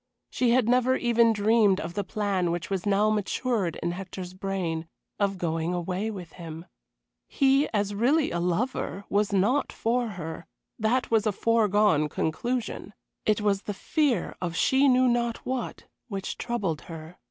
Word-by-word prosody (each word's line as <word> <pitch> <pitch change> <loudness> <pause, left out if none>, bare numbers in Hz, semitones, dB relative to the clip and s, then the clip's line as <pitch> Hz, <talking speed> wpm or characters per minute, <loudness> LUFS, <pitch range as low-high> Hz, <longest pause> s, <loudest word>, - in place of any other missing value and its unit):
She 250 - +1
had 240 -1 +3
never 250 +1 +3
even 235 -2 +3
dreamed 210 -2 +3
of 165 +2 -5
the 205 - -2
plan 195 -3 -1
which 175 +3 -3
was 195 +1 -2
now 205 +2 +3
matured 210 -3 -1
in 170 - 0
Hector's 185 0 -7
brain 185 -4 -3 0.3
of 200 -1 +1
going 165 0 -1
away 180 +4 -2
with 180 -6 -7
him. 165 -1 -8 0.6
He, 275 +1 +3
as 205 -1 -1
really 270 +9 +2
a 170 - -1
lover, 195 +2 -1
was 205 +1 +1
not 210 +9 +2
for 240 +1 0
her, 165 0 -6 0.3
that 230 +4 +1
was 220 -1 +3
a - - +3
foregone 210 -7 +2
conclusion. 225 - -3 0.3
It 215 0 +2
was 200 -2 +1
the 205 - -5
fear 270 - 0
of 170 -2 -3
she 265 +10 +3
knew 255 -1 +5
not 235 -1 0
what 255 -2 -4 0.2
which 195 -4 -4
troubled 200 -11 -2
her. 165 +1 -9
205 Hz, 160 wpm, -27 LUFS, 180-235 Hz, 0.6 s, knew